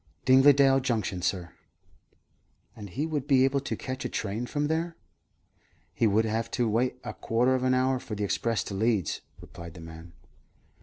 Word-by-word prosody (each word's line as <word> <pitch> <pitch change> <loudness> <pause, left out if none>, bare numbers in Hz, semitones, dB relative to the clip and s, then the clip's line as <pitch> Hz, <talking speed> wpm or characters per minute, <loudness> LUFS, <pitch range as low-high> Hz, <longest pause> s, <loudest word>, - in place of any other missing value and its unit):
"Dingledale 135 +1 +6
Junction, 110 -7 -1
sir." 90 -2 -2 1.2
"And 105 -3 -9
he 140 - -2
would 150 -4 -3
be 135 -2 +5
able 135 +1 +1
to 135 - -4
catch 130 0 -5
a - - -3
train 110 +3 -3
from 145 +3 -1
there?" 165 +2 -1 1.0
"He 115 - +2
would 110 +2 +2
have 115 +1 -2
to 120 -2 +2
wait 120 +4 +1
a - - -5
quarter 120 +3 +1
of 130 - 0
an 130 0 +2
hour 130 0 +1
for 110 - -6
the 105 - -3
express 115 +3 0
to - - -7
Leeds," 105 -4 0 0.2
replied 85 0 -11
the - - -10
man. 80 +1 -11
120 Hz, 175 wpm, -28 LUFS, 100-135 Hz, 1.2 s, Dingledale